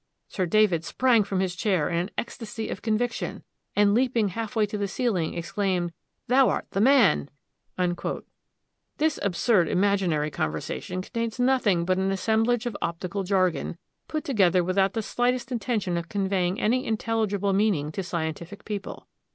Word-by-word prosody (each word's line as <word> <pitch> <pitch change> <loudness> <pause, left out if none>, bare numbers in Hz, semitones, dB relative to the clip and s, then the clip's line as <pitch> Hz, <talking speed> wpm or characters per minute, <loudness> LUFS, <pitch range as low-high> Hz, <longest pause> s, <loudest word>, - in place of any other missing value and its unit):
Sir 185 -4 -2
David 185 -3 +3
sprang 240 +2 +3
from 195 -1 -1
his 185 -2 -1
chair 180 -4 +1
in 170 - -2
an 175 +3 -1
ecstasy 225 -1 -5
of - - -5
conviction, 235 +2 -2 0.3
and 205 0 +4
leaping 230 -3 +2
half 225 +4 -5
way 220 -2 +3
to 210 - -6
the 205 -1 -1
ceiling, 195 -7 -1
exclaimed, 175 +1 -1 0.3
'Thou 260 +1 +4
art - - -1
the 195 - 0
man.' 245 - +4 1.7
"This 310 0 +1
absurd 200 -1 +2
imaginary 180 -6 +1
conversation 110 - -3
contains 230 +3 -4
nothing 245 -9 +2
but 185 +1 +1
an 190 0 +1
assemblage 220 +4 +1
of 240 -4 -3
optical 180 +4 -3
jargon, 185 -5 0 0.3
put 310 -1 -3
together 185 - +3
without 190 +2 +1
the 225 - -2
slightest 245 +2 0
intention 215 -6 -1
of 170 0 -5
conveying 190 -2 0
any 250 +4 +2
intelligible 215 -3 0
meaning 190 -8 +1
to 195 - -3
scientific 170 +2 -5
people. 205 -2 -6
200 Hz, 150 wpm, -26 LUFS, 180-225 Hz, 1.7 s, and